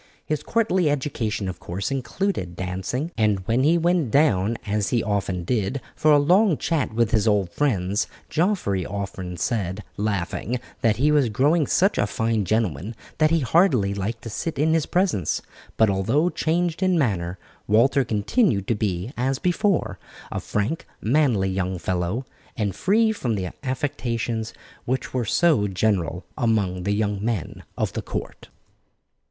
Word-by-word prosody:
His 155 -1 -1
courtly 190 -8 +1
education, 125 -8 -2
of 90 -2 -5
course, 95 +4 -4
included 135 - -2
dancing, 95 - -3
and 105 -3 +2
when 115 +3 +2
he 160 +4 +4
went 170 -5 +2
down, 115 -5 +3
as 105 -1 0
he 120 -2 +1
often 95 -4 -1
did, 110 +5 -1 0.2
for 155 -1 +3
a 145 - +7
long 180 +4 +4
chat 160 -8 -1
with 115 0 +1
his 110 -1 +2
old 100 -4 +2
friends, 100 -8 0 0.2
Geoffrey 160 - 0
often 95 -2 -5
said, 95 +1 -2
laughing, 105 +3 -2 0.2
that 115 -2 +3
he 145 +4 +2
was 145 -5 +3
growing 145 +7 +2
such 195 +3 +2
a 105 - +2
fine 110 0 0
gentleman 105 - -1 0.2
that 155 0 +5
he 165 0 +2
hardly 125 - +3
liked 110 +4 -4
to 115 - -6
sit 160 +8 -3
in 155 +3 +2
his 160 -2 +1
presence; 175 - 0 0.3
but 110 - +5
although 115 - +2
changed 170 +1 0
in 185 -2 +3
manner, 95 - 0 0.3
Walter 125 +6 +4
continued 110 - +1
to - - +4
be, 105 +2 -2
as 130 +2 0
before, 175 - 0 0.3
a - - -2
frank, 105 +11 -2
manly 115 -6 +2
young 95 0 -1
fellow, 90 +8 -2 0.3
and 105 -5 -1
free 220 +3 +3
from 125 - -2
the 90 -3 -3
affectations 120 -4 -2 0.3
which 130 +2 -2
were 125 -2 0
so 150 -3 +3
general 95 -3 0
among 100 -7 0
the 100 - +1
young 105 -1 -1
men 110 -8 -2 0.2
of - - -1
the - - -3
court. - - -6
115 Hz, 160 wpm, -24 LUFS, 100-150 Hz, 0.3 s, a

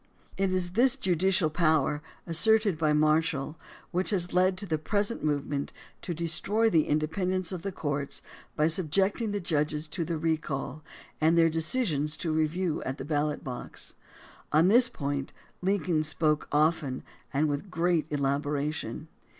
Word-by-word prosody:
It 195 -1 0
is 180 -1 0
this 245 +6 +4
judicial 185 - +1
power, 155 -3 +2 0.2
asserted 210 +3 +4
by 155 -1 +1
Marshall, 155 -1 +1 0.4
which 180 +2 0
has 180 -4 +1
led 185 +1 +3
to 200 - -2
the 160 -4 -1
present 205 +7 -1
move 145 -2 0
ment 140 -1 -3 0.3
to 175 - -4
destroy 200 +7 +2
the 160 -4 +3
independence 180 +4 0
of 180 -3 -4
the 195 - -4
courts 145 -5 -3 0.3
by 150 - +2
subjecting 190 +6 +1
the 205 0 -2
judges 150 -3 0
to 170 +2 -2
the 165 0 -3
recall 155 -2 -2 0.4
and 160 +2 +4
their 165 -1 +5
decisions 155 - 0
to 160 -3 -1
review 160 +2 0
at 130 +1 -4
the - - -6
ballot 150 0 -1
box. 125 -2 -6 0.6
On 160 +4 +4
this 240 +3 +5
point 140 -1 -4 0.3
Lincoln 180 -4 +1
spoke 155 0 +1
often 150 -3 +1 0.3
and 145 +2 +1
with 145 +6 -3
great 170 -2 +1
elaboration. 145 0 -2
160 Hz, 150 wpm, -28 LUFS, 150-185 Hz, 0.6 s, their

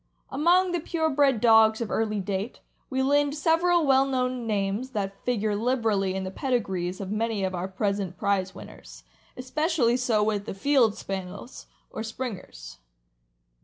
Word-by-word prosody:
Among 350 +6 +3
the 350 - 0
pure 320 -1 -1
bred 275 -4 +3
dogs 220 -1 +5
of 230 -3 -4
early 215 -2 0
date, 195 +3 -4 0.3
we 265 -1 0
lind 285 +1 +2
several 330 +2 +2
well 270 -1 +5
known 255 -2 -1
names 205 +4 -1
that 195 -2 -4
figure 215 -4 0
liberally 215 -5 0
in 190 - -2
the 185 - -5
pedigrees 190 -8 -2
of 195 -1 -5
many 215 -1 -1
of 190 0 -1
our 180 +1 -3
present 195 -1 -2
prize 195 -2 0
winners; - - -12 0.3
especially 260 -1 +1
so 235 -4 +1
with 210 -1 -1
the - - -5
Field 235 -1 +2
Spaniels, 195 +5 -7 0.2
or - - -5
Springers. 220 - -7
225 Hz, 155 wpm, -26 LUFS, 195-265 Hz, 0.3 s, dogs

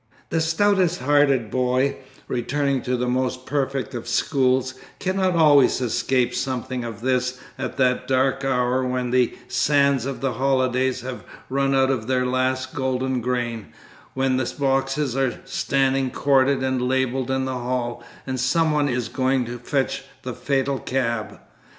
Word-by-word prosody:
The 165 - +1
stoutest 180 +1 +2
hearted 135 -5 +3
boy, 130 +2 +1 0.3
returning 140 +2 -1
to 125 +1 -1
the 125 +1 -1
most 130 0 -1
perfect 135 -1 -2
of 120 - -6
schools, 130 -2 +1 0.2
cannot 185 -1 0
always 150 -5 +5
escape 125 0 0
something 130 -1 -3
of 115 -1 -7
this 125 0 0 0.2
at - - -5
that 125 -2 +1
dark 135 +1 +1
hour 130 -1 +1
when 125 -1 -2
the 125 -1 +2
sands 140 0 +2
of 135 - -4
the 135 -2 -1
holidays 130 0 +1
have 125 0 -6 0.3
run 135 0 +1
out 135 0 +3
to 135 - +2
their 125 +3 -1
last 130 +1 -1
golden 130 -1 -1
grain, 120 -3 -2 0.5
when 130 -1 +1
the 130 - -1
boxes 135 0 0
are 135 -2 0
standing 135 -1 +1
corded 135 0 +2
and 130 -1 0
labelled 130 0 0
in 130 0 0
the 130 - -2
hall, 120 -1 -3 0.2
and 130 -1 -3
some 160 +6 +2
one 145 -1 +1
is 125 -2 -1
going 130 +1 0
to 120 +1 -6
fetch 135 +2 -1 0.2
the 125 - -4
fatal 135 0 -1
cab. 120 -4 -2
130 Hz, 155 wpm, -23 LUFS, 125-135 Hz, 0.5 s, always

